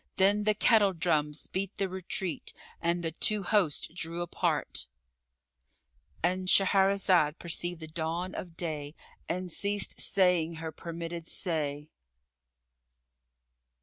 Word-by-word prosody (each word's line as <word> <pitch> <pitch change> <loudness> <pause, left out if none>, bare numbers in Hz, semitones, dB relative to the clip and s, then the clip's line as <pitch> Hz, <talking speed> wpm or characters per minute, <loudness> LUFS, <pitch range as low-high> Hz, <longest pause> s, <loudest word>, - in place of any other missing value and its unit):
Then 200 +2 +4
the 215 -1 +4
kettle 205 -2 +4
drums 155 -3 0
beat 195 +1 -4
the 195 - 0
retreat, 185 -2 -3 0.3
and 170 +1 0
the 165 - -1
two 205 +5 +3
hosts 180 -6 +2
drew 170 0 -3
apart,——And 60 - -5
Shahrazad 190 -5 +4
perceived 175 0 -2
the 160 - -6
dawn 165 +3 -3
of 170 -2 -7
day 155 -3 -4 0.3
and 180 +1 -3
ceased 205 +3 -1
saying 180 -4 +3
her 160 0 -5
permitted 170 0 -6
say. 150 -4 -2
170 Hz, 110 wpm, -30 LUFS, 155-185 Hz, 0.3 s, Then